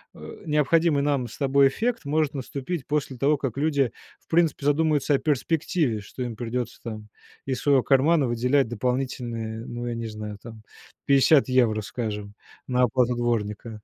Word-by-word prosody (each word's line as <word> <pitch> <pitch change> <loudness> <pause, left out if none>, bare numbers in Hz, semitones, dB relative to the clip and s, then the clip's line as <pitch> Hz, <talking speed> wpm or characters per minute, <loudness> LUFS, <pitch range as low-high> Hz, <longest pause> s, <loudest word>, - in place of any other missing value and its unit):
э, - - -11
необходимый 150 0 +2
нам 140 -4 0
с - - -11
тобой 140 0 +4
эффект 230 - -2
может 150 0 +1
наступить 140 +3 -5
после 145 -3 -2
того, 145 +3 +2
как 135 -3 -4
люди, 140 -4 +1 0.3
в - - -36
принципе, 160 -4 +1
задумаются 150 0 +2
о - - +1
перспективе. 150 -3 0
Что 125 +5 -7
им 120 -2 -5
придётся 120 +1 -4
там 110 -2 -7 0.4
из 130 -2 -2
своего 140 -3 +3
кармана 140 +2 +3
выделять 125 +3 +2
дополнительные, 120 -2 -3
ну, 120 0 -5
я 120 - -2
не 115 0 -4
знаю, 105 -1 -7
там 115 -2 -11 0.4
50 140 +1 +5
евро, 120 -4 +3
скажем, 105 -2 -5 0.3
на 125 -1 +2
оплату 125 0 +2
дворника. 115 -2 -2
130 Hz, 160 wpm, -25 LUFS, 115-145 Hz, 0.4 s, 50